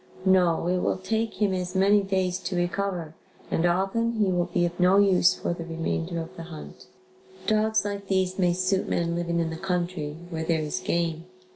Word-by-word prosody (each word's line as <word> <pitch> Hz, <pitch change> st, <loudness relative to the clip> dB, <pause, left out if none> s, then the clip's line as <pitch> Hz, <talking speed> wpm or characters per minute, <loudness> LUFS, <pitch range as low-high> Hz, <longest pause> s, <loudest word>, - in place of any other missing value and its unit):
No, 180 Hz, -4 st, +3 dB
it 180 Hz, +1 st, +1 dB
will -, -, 0 dB
take 220 Hz, +4 st, -2 dB
him 205 Hz, -3 st, +2 dB
as 180 Hz, 0 st, -3 dB
many 200 Hz, +2 st, +5 dB
days 190 Hz, -2 st, -1 dB
to 185 Hz, 0 st, -4 dB
recover 175 Hz, -2 st, -2 dB, 0.4 s
and 170 Hz, -, +2 dB
often 195 Hz, +6 st, +1 dB
he 210 Hz, -4 st, +1 dB
will 175 Hz, -1 st, +1 dB
be 175 Hz, -, +2 dB
of 175 Hz, +1 st, -4 dB
no 180 Hz, +2 st, +5 dB
use 190 Hz, -3 st, +5 dB
for -, -, -2 dB
the 170 Hz, -, -6 dB
remainder 165 Hz, +1 st, -3 dB
of 165 Hz, 0 st, -7 dB
the -, -, -8 dB
hunt. 155 Hz, -3 st, -10 dB, 0.6 s
Dogs 215 Hz, -1 st, +2 dB
like 200 Hz, -1 st, -4 dB
these 190 Hz, -1 st, 0 dB
may 180 Hz, -2 st, +3 dB
suit 185 Hz, +2 st, 0 dB
men 170 Hz, 0 st, 0 dB
living 170 Hz, 0 st, -1 dB
in 165 Hz, -1 st, -1 dB
the 160 Hz, -, -5 dB
country 175 Hz, -4 st, -2 dB, 0.2 s
where 160 Hz, -1 st, -3 dB
there 160 Hz, -1 st, +1 dB
is 150 Hz, -1 st, -2 dB
game. 170 Hz, -1 st, -1 dB
180 Hz, 195 wpm, -26 LUFS, 170-195 Hz, 0.6 s, many